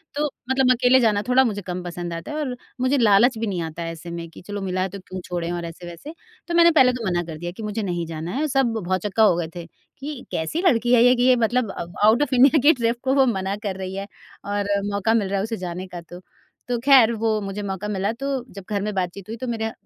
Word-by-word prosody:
तो 295 +1 0 0.2
मतलब 265 -1 +3
अकेले 255 +1 +4
जाना 215 -4 +2
थोड़ा 255 +1 +5
मुझे 205 -4 -2
कम 180 0 -5
पसंद 175 -1 -5
आता 165 - -6
है 300 - -4
और 265 -5 -2 0.3
मुझे 260 +2 +2
लालच 230 +1 +4
भी 225 0 -2
नहीं 180 -4 -2
आता 165 +1 -6
है 165 - -4
ऐसे 165 +1 -9
में 170 -1 -6
कि - - -13
चलो 205 -1 -4
मिला 185 -1 -2
है 190 - -1
तो 200 +2 -8
क्यों 185 0 -8
छोड़ें 175 -1 -3
और 175 -1 -3
ऐसे-वैसे। 175 - -9 0.3
तो 345 - -3
मैंने 340 0 +6
पहले 260 -5 +5
तो 235 -4 -5
मना 175 0 0
कर 160 -2 -8
दिया 175 +2 -5
कि 205 +5 -9
मुझे 215 +1 -3
नहीं 175 -3 -2
जाना 165 +1 -5
है। 300 +5 -1
सब 265 -4 +1
भौचक्का 195 +4 +1
हो 190 -5 +5
गए 165 -2 -2
थे 170 - -6 0.3
कि 280 -1 -7
कैसी 160 - -2
लड़की 240 -3 +3
है 235 - +6
ये 250 +1 +6
कि 245 - +1
ये 255 0 +6
मतलब 235 -2 +1
अ, 170 - -5 0.2
आउट 235 +6 +5
ऑफ़ 260 -2 -1
इंडिया 275 +4 +6
के 305 +4 +6
ट्रिप 235 -2 -1
को 265 0 +1
वो 270 -1 +5
मना 195 -4 -1
कर 190 - -3
रही 190 0 -5
है 195 +1 -5 0.4
और 205 0 -2 0.2
मौका 205 +3 +1
मिल 215 -4 +1
रहा 200 - 0
है 195 - -1
उसे 225 +1 -3
जाने 180 +2 -6
का 175 -1 -8
तो। 175 +2 -12 0.5
तो 245 - 0
ख़ैर 255 -3 +6
वो 225 - +2
मुझे 200 +1 -5
मौका 195 +1 -4
मिला 200 +1 -1
तो 275 - -3 0.3
जब 195 0 -9
घर 200 -1 0
में 210 0 -2
बातचीत 185 +1 -3
हुई 225 - -4
तो 255 - -5
मेरा 225 -1 -2
210 Hz, 265 wpm, -23 LUFS, 180-250 Hz, 0.5 s, मैंने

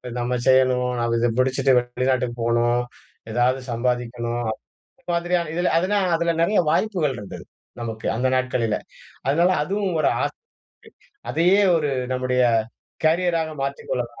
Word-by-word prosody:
இது 125 - -7
நம்ம 120 +1 -1
செய்யணும், 130 -1 +4
நம்ம 115 0 0
இத 120 +1 +2
பிடிச்சுட்டு 130 +1 +2
வெளிநாட்டுக்கு 125 0 -1
போணும், 120 +1 +2 0.5
எதாவது 125 +3 +2
சம்பாதிக்கணும், 120 0 -2 0.6
இது - - -46
மாதிரியான, 170 -1 0
இதில 175 +1 +1
அதுனா 185 +5 +1 0.2
அதில 170 0 +1
நெறைய 200 +5 +3
வாய்ப்புகள் 165 -7 0
இருந்தது 105 -2 -9 0.4
நமக்கு 115 -2 -5
அந்த 125 +3 +1
நாட்களில. 125 -4 0 0.5
அதனால 170 +6 +3
அதுவும் 195 +1 -2
ஒரு - - +3
ஆசை. - - -3 0.9
அதையே 180 +5 +3 0.2
ஒரு 150 -2 0 0.2
நம்முடைய 125 0 +1 0.6
கேரியராக 165 0 +2
மாற்றிக் 140 0 -4
கொள்ளலாம், 120 -1 -3
130 Hz, 130 wpm, -23 LUFS, 120-165 Hz, 0.9 s, செய்யணும்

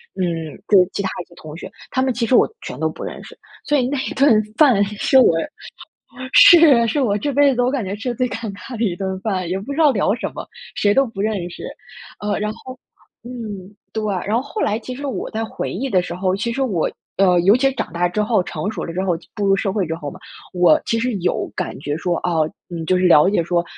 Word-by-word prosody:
嗯， 165 -4 -2 0.2
就 190 -3 +6
其 - - -2
他 190 - -2
一 - - -26
些 170 - -20
同 155 0 -10
学， - - -9 0.2
她 260 - 0
们 260 -1 +1
其 235 0 -1
实 250 - +3
我 - - +6 0.2
全 - - -7
都 - - 0
不 - - -10
认 - - -6
识。 - - -12 0.3
所 295 - +1
以 255 -2 +1
那 285 +1 -2
一 - - -4
顿 240 -6 +4
饭 255 -10 +5
是 210 +6 +1
我 245 - +5 1.0
是 295 -9 +8
是 290 +6 0
我 210 -6 +1
这 285 +7 -2
辈 280 -1 +4
子 245 - +1
我 250 - +2
感 270 -3 -1
觉 195 0 -4
吃 235 +4 -4
得 - - -3
最 250 -1 0
尴 225 -3 -5
尬 205 +6 -9
的 225 - -1
一 185 - 0
顿 190 0 -3
饭， 185 -5 -2
也 185 - -1
不 220 +9 -6
知 295 - -6
道 310 -2 +6
聊 205 -4 +1
什 235 - -4
么， - - -7 0.3
谁 205 -1 +2
都 270 -2 +2
认 195 -3 -2
识。 - - -10 0.6
呃， 210 0 -1
然 210 0 -2
后 255 +3 -11 0.5
嗯， 210 -5 -8 0.2
对， 220 -1 -2 0.2
然 215 +3 +1
后 250 - +1
后 425 - -6
来 215 +1 +1
其 255 +2 -7
实 285 +3 -6
我 265 - -4
在 225 0 -3
回 225 - -4
忆 255 +9 -3
的 185 -7 +2
时 175 - -6
候， 185 +1 0
其 235 +3 -2
实 270 - -4
我 195 -11 0 0.3
呃， 185 -2 +4
尤 195 +6 +5
其 270 +1 +3
是 270 - -4
长 - - -4
大 175 +1 +1
之 210 +4 -1
后 215 -1 +2
成 195 +4 -4
熟 195 -7 -5
了 165 - -6
之 185 - -2
后、 180 -3 0 0.2
步 210 - -2
入 195 0 +4
社 195 -1 -1
会 195 -3 0
之 160 - -2
后 150 -3 -7
嘛， - - -13 0.3
我 180 -1 +4
其 230 - 0
实 250 +1 0
有 185 -3 -1
感 - - -3
觉 145 0 -3
说 175 +1 -1
哦， 160 -3 0 0.4
就 185 - +2
是 180 0 +2
了 150 +1 +6
解 200 -4 +2
说 170 +1 0
210 Hz, 275 characters per minute, -20 LUFS, 185-250 Hz, 1.0 s, 是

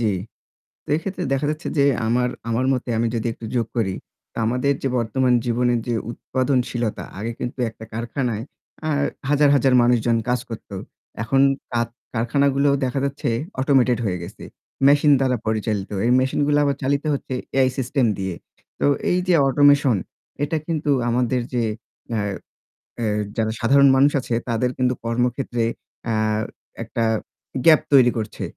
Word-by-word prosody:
জ্বি। 110 -3 +2 0.8
তো - - -14
এক্ষেত্রে 190 +5 -4
দেখা 135 +2 0
যাচ্ছে 155 +1 -4
যে 140 - +5 0.2
আমার 125 +2 +2 0.2
আমার 115 +3 0
মতে 125 -1 -3
আমি 115 +1 +1
যদি 115 +1 -1
একটু 115 - -10
যোগ 115 -2 +1
করি 100 -5 +1 0.4
তো - - -11
আমাদের 125 +5 +1
যে - - +2
বর্তমান 125 +2 +1
জীবনের 120 0 +1
যে 120 - 0 0.2
উৎপাদনশীলতা 125 -3 -1 0.2
আগে 115 +3 -3
কিন্তু 125 +2 -5
একটা 110 0 -12
কারখানায় 115 -1 -2 0.4
আ - - 0 0.4
হাজার, 145 0 +4
হাজার, 135 -1 +3
মানুষজন 120 -1 +3
কাজ 125 0 +2
করতো। 110 -3 -8 0.5
এখন 135 +4 +2 0.3
কা 120 -1 +1 0.3
কারখানাগুলো 140 +4 +2
দেখা 130 +1 -1
যাচ্ছে 140 -2 -2 0.3
অটোমেটেড 130 -3 +3
হয়ে 90 -3 -1
গেছে। 85 - -10 0.4
মেশিন 145 +1 +5
দ্বারা 130 -2 +1
পরিচালিত। 110 -2 -1 0.2
এই 120 - +3
মেশিনগুলো 145 +3 +1
আবার 140 -1 +1
চালিত 140 +2 +1
হচ্ছে 135 -1 -4 0.2
AI 130 -1 +4
সিস্টেম 130 0 +1
দিয়ে। 95 -2 -3 0.4
তো - - +1 0.3
এই 180 - +2
যে 180 - +4
অটোমেশন 145 -3 +4 0.5
এটা 160 +2 0
কিন্তু 155 -3 0 0.2
আমাদের 125 +1 +1
যে 120 -1 +1 0.5
এ - - 0 0.8
এ্যা 115 - 0 0.3
যারা 110 -1 +1
সাধারণ 140 +4 +5
মানুষ 140 +2 +5
আছে 125 - -4 0.2
তাদের 120 +2 +1
কিন্তু 125 0 +2
কর্মক্ষেত্রে 120 +1 -1 0.4
এ্যা 115 -1 0 0.7
একটা 115 - -2 0.6
গ্যাপ 160 -2 +7
তৈরি 125 -3 +7
করছে। 110 -1 -4
125 Hz, 150 wpm, -22 LUFS, 115-140 Hz, 0.8 s, গ্যাপ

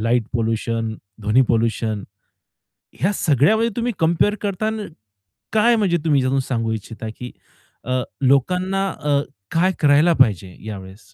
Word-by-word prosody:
Light 115 +1 +1
pollution, 115 -1 -1 0.3
ध्वनी 105 +5 +3
pollution, 110 -2 0 1.0
ह्या 190 - +2
सगळ्यामध्ये 200 - +3
तुम्ही 240 0 -1
कंपेअर 170 +5 +2
करताना 215 +2 -2 0.7
काय 230 +2 +4
म्हणजे 195 -6 +2
तुम्ही 145 -4 +3
त्यातून 130 +1 +1
सांगू 115 -4 -2
इच्छिता, 110 +1 -6
की 125 0 -7 0.5
अ, 130 +1 0 0.2
लोकांना 180 +9 +2
अ, 145 -1 +2 0.3
काय 180 +3 +3
करायला 150 +3 +5
पाहिजे 95 -7 +2
यावेळेस? 95 -1 -8
135 Hz, 125 wpm, -21 LUFS, 115-185 Hz, 1.0 s, करायला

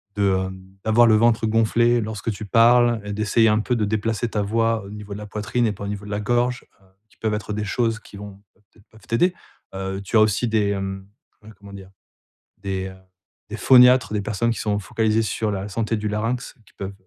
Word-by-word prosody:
de, 100 -2 +2
hem, 95 0 -11 0.2
d'avoir 115 +2 +5
le 110 - +5
ventre 115 0 +3
gonflé 115 +2 +2
lorsque 110 +1 -4
tu 105 +1 -7
parles 120 +2 +4
et 105 - -6
d'essayer 110 +2 +2
un 105 0 +2
peu 125 +3 -1
de 110 - 0
déplacer 110 +2 -1
ta 105 - -1
voix 115 +1 0
au - - -10
niveau 105 0 -10
de - - -6
la 105 - -7
poitrine 105 +4 -2
et - - 0
pas 100 - -9
au - - -4
niveau 100 0 -5
de - - -9
la 105 0 -2
gorge, 120 +2 0 0.2
heu, - - -25 0.2
qui - - -27
peuvent 110 -1 -2
être 105 0 -4
des 105 0 -3
choses 115 +1 -1
qui 105 - -16
vont 100 -1 -10
peut-être 105 -1 -27
peuvent 110 -1 -20
t'aider, 175 +11 +2 0.4
heu, 95 0 -4
tu 100 - -4
as - - +6
aussi 110 +3 +2
des, 110 -2 +1
hem, 95 -1 -4 0.4
ouais 110 - -13
comment 100 0 -14
dire? 95 -1 -11 0.7
Des, 95 -1 -3
hem, 95 0 -10 0.5
des - - -5
phoniatres, 125 -1 +6
des 105 - 0
personnes 110 +3 -1
qui 115 - -4
sont 105 -1 -1
focalisées 110 +2 0
sur 110 0 -2
la 100 0 -4
santé 115 +2 -1
du 105 0 -3
larynx 115 +4 -3
qui - - -24
peuvent 100 0 -6
105 Hz, 230 wpm, -22 LUFS, 100-115 Hz, 0.7 s, as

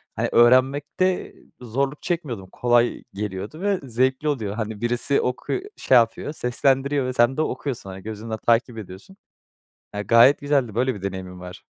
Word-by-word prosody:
hani, - - -1
öğrenmekte 140 +9 +3 0.3
zorluk 135 +5 -2
çekmiyordum. 130 - -3
Kolay 120 0 +1
geliyordu 105 - -5
ve 200 -2 +1
zevkli 130 +3 0
oluyor. 110 -8 -2
Hani, 110 -1 -5
birisi 120 +4 +1
oku 125 0 -3 0.2
şey 130 - +3
yapıyor, 115 +5 +1
seslendiriyor 135 +1 +1
ve 130 - -2
sen 120 +3 +3
de - - +2
okuyorsun. 130 -9 -3
Hani, 95 0 -9
gözünle 110 +1 -5
takip 115 +1 +1
ediyorsun. 105 - -10 0.8
Ya, 105 - -2
gayet 115 +6 +5
güzeldi, 140 -7 0
böyle 130 +2 +1
bir 100 - -10
deneyimin 95 -2 -6
var. 90 0 -10
120 Hz, 155 wpm, -23 LUFS, 110-140 Hz, 0.8 s, gayet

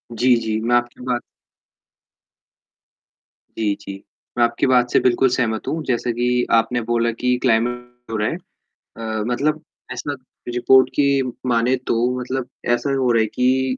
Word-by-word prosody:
जी, 125 +2 +4
जी। 110 -2 -1
मैं 120 +1 +2
आपकी 120 0 -1
बात 125 -1 -1 2.4
जी, 105 -2 +1
जी। 100 0 -9 0.3
मैं 120 - +4
आपकी 120 +2 0
बात 125 -1 +3
से - - +4
बिल्कुल 125 +1 +3
सहमत 120 -3 -1
हूँ। 160 0 -2
जैसा 125 -3 -1
कि 125 +1 +1
आपने 120 +1 +2
बोला 115 0 +2
कि 125 0 +2
क्लाइमेट 120 0 -1
हो - - -2
रहा 105 +1 0
है। - - -3 0.6
अ, 110 -1 -3
मतलब 150 +5 0 0.3
ऐसा 145 +3 -4 0.4
रिपोर्ट 130 +1 +5
की 145 - +3 0.4
मानें 120 +1 +2
तो - - +1 0.2
मतलब 125 0 -3 0.3
ऐसा 140 +3 -3
हो 130 -2 +2
रहा 115 - +3
है - - +2
कि 130 +1 +1
120 Hz, 155 wpm, -21 LUFS, 115-130 Hz, 2.4 s, रिपोर्ट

